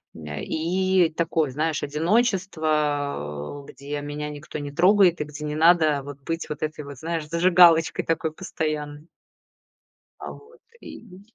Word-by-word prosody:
м, 80 Hz, -, -10 dB
э, 75 Hz, 0 st, -6 dB
и 180 Hz, +2 st, +1 dB
такое, 160 Hz, -3 st, 0 dB
знаешь, 155 Hz, +3 st, -1 dB
одиночество, 150 Hz, -, -1 dB
где 145 Hz, +1 st, -6 dB
меня 145 Hz, +1 st, -5 dB
никто 150 Hz, +1 st, -8 dB
не 145 Hz, -1 st, -6 dB
трогает, 180 Hz, +1 st, +4 dB
и -, -, +1 dB
где 150 Hz, 0 st, -8 dB
не 150 Hz, 0 st, -3 dB
надо 155 Hz, -3 st, +4 dB
вот 140 Hz, 0 st, -10 dB
быть 165 Hz, +2 st, -4 dB
вот 150 Hz, -, -5 dB
этой 155 Hz, -1 st, -4 dB
вот, 140 Hz, -1 st, -9 dB
знаешь, 165 Hz, +1 st, -4 dB
зажигалочкой 170 Hz, 0 st, +4 dB
такой 160 Hz, -1 st, -1 dB
постоянной. 155 Hz, -3 st, -4 dB, 1.1 s
А -, -, -6 dB
вот 465 Hz, +2 st, -17 dB, 0.2 s
и 185 Hz, -4 st, -12 dB
155 Hz, 145 wpm, -24 LUFS, 145-170 Hz, 1.1 s, трогает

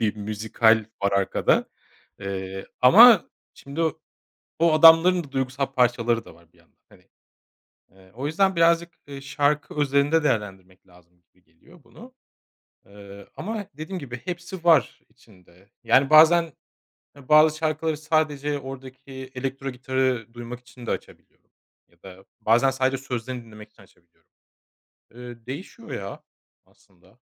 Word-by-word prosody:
bir 110 Hz, -2 st, -1 dB
müzikal 110 Hz, +2 st, +1 dB, 0.2 s
var 100 Hz, 0 st, +1 dB
arkada. 100 Hz, -1 st, +1 dB, 0.5 s
Eee, 95 Hz, -1 st, -6 dB
ama 210 Hz, -, +7 dB, 0.2 s
şimdi 140 Hz, +4 st, -8 dB, 0.8 s
o 165 Hz, -1 st, +3 dB
adamların 165 Hz, +3 st, +6 dB
da 140 Hz, -, -16 dB
duygusal 135 Hz, +1 st, -2 dB
parçaları 120 Hz, -3 st, 0 dB
da -, -, -15 dB
var 85 Hz, 0 st, -25 dB
bir -, -, -28 dB
yandan, -, -, -30 dB
hani. -, -, -23 dB, 0.8 s
Eee, 95 Hz, 0 st, -22 dB
o 135 Hz, +4 st, -4 dB
yüzden 190 Hz, +5 st, +1 dB
birazcık, 170 Hz, 0 st, +2 dB, 0.2 s
eee, 140 Hz, -1 st, -9 dB
şarkı 145 Hz, +1 st, -1 dB
özelinde 145 Hz, +2 st, +1 dB
değerlendirmek 95 Hz, -8 st, -4 dB
lazım 90 Hz, -1 st, -24 dB
gibi 90 Hz, -, -34 dB
geliyor 165 Hz, -, -23 dB
bunu. 240 Hz, -, -16 dB, 0.7 s
Eee, 100 Hz, 0 st, -14 dB
ama 215 Hz, 0 st, -5 dB
dediğim 165 Hz, +5 st, -6 dB
gibi 125 Hz, -5 st, -9 dB
hepsi 180 Hz, 0 st, -7 dB
var 160 Hz, -7 st, +3 dB
içinde. 95 Hz, -5 st, -24 dB
Yani, 135 Hz, +1 st, +3 dB
bazen, 160 Hz, +1 st, +5 dB, 0.6 s
eee, 140 Hz, -3 st, -17 dB
bazı 155 Hz, 0 st, +5 dB
şarkıları 155 Hz, 0 st, -2 dB
sadece 150 Hz, -2 st, -1 dB
oradaki 130 Hz, 0 st, -11 dB
elektro 135 Hz, +1 st, -5 dB
gitarı 130 Hz, -3 st, -2 dB
duymak 120 Hz, 0 st, -9 dB
için 125 Hz, 0 st, -15 dB
de -, -, -3 dB
açabiliyorum -, -, -9 dB, 0.4 s
ya 85 Hz, 0 st, -33 dB
da 95 Hz, 0 st, -14 dB, 0.2 s
bazen 115 Hz, +5 st, +3 dB
sadece 130 Hz, 0 st, -1 dB
sözlerini 125 Hz, -1 st, -6 dB
dinlemek 105 Hz, -1 st, -14 dB
için 100 Hz, -, -20 dB
açabiliyorum. 85 Hz, -2 st, -30 dB, 0.9 s
Eee, 120 Hz, -2 st, -11 dB
değişiyor 185 Hz, -, -9 dB
ya -, -, -7 dB, 0.4 s
aslında. -, -, -28 dB
130 Hz, 135 wpm, -23 LUFS, 110-155 Hz, 0.9 s, ama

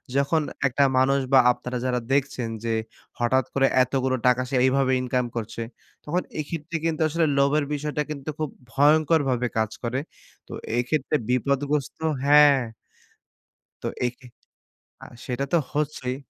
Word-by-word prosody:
যখন 140 Hz, +3 st, +2 dB, 0.3 s
একটা 135 Hz, +2 st, +1 dB
মানুষ 135 Hz, +1 st, +3 dB
বা 135 Hz, -, +8 dB
আপনারা 125 Hz, +1 st, -5 dB
যারা 125 Hz, -1 st, 0 dB
দেখছেন 130 Hz, -4 st, 0 dB
যে, 115 Hz, -1 st, -1 dB, 0.5 s
হঠাৎ 130 Hz, +2 st, +2 dB
করে 135 Hz, -1 st, +3 dB, 0.2 s
এতগুলো 130 Hz, 0 st, 0 dB
টাকা 125 Hz, 0 st, +4 dB
সে 135 Hz, -, -2 dB
এইভাবে 130 Hz, 0 st, +2 dB
ইনকাম 125 Hz, 0 st, 0 dB
করছে। 115 Hz, 0 st, -4 dB, 0.4 s
তখন 175 Hz, +5 st, 0 dB, 0.2 s
এক্ষেত্রে 165 Hz, +2 st, -4 dB
কিন্তু 160 Hz, -1 st, -1 dB
আসলে 165 Hz, +1 st, +1 dB
লোভের 145 Hz, +2 st, +3 dB
বিষয়টা 150 Hz, +1 st, -2 dB
কিন্তু 140 Hz, 0 st, -6 dB
খুব 155 Hz, -3 st, -1 dB, 0.2 s
ভয়ংকরভাবে 145 Hz, -3 st, +3 dB
কাজ 110 Hz, -1 st, 0 dB
করে। 125 Hz, +3 st, -1 dB, 0.5 s
তো -, -, -14 dB, 0.2 s
এই 120 Hz, -, +3 dB
ক্ষেত্রে 150 Hz, -1 st, 0 dB
বিপদগ্রস্ত 140 Hz, +2 st, 0 dB, 0.3 s
হ্যাঁ। 145 Hz, -1 st, +7 dB, 1.3 s
তো -, -, -1 dB, 0.2 s
এক্ষে 125 Hz, +1 st, -9 dB, 0.8 s
আ -, -, -9 dB, 0.2 s
সেটা 130 Hz, +2 st, -2 dB
তো 170 Hz, -, +6 dB, 0.2 s
হচ্ছেই। 145 Hz, -4 st, -2 dB
135 Hz, 140 wpm, -24 LUFS, 125-150 Hz, 1.3 s, বা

